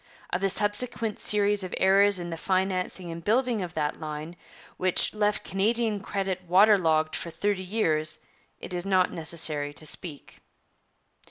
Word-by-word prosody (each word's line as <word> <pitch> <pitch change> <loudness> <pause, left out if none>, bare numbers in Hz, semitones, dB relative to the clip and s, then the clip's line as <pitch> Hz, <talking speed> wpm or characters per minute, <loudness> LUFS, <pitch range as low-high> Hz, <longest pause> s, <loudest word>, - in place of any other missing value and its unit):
Of 180 - -1
the 195 - +2
subsequent 215 +2 -1
series 205 -1 +2
of 185 - -5
errors 200 +1 +5
in 175 -1 -5
the - - -3
financing 185 0 -1
and 165 0 -8
building 235 +1 +2
of 175 -3 -6
that 150 -1 -2
line, 155 +2 -6 0.4
which 185 -1 +1
left 210 -1 0
Canadian 215 +2 +1
credit 195 -2 -3
water 200 +5 +6
logged 155 -2 +1
for 170 - -4
thirty 205 +3 -1
years, 160 -6 0 0.4
it - - -9
is 175 -1 -2
not 185 -1 +2
necessary 155 -3 -2
to 155 - -5
speak. 150 -1 -6
185 Hz, 155 wpm, -27 LUFS, 165-205 Hz, 0.4 s, water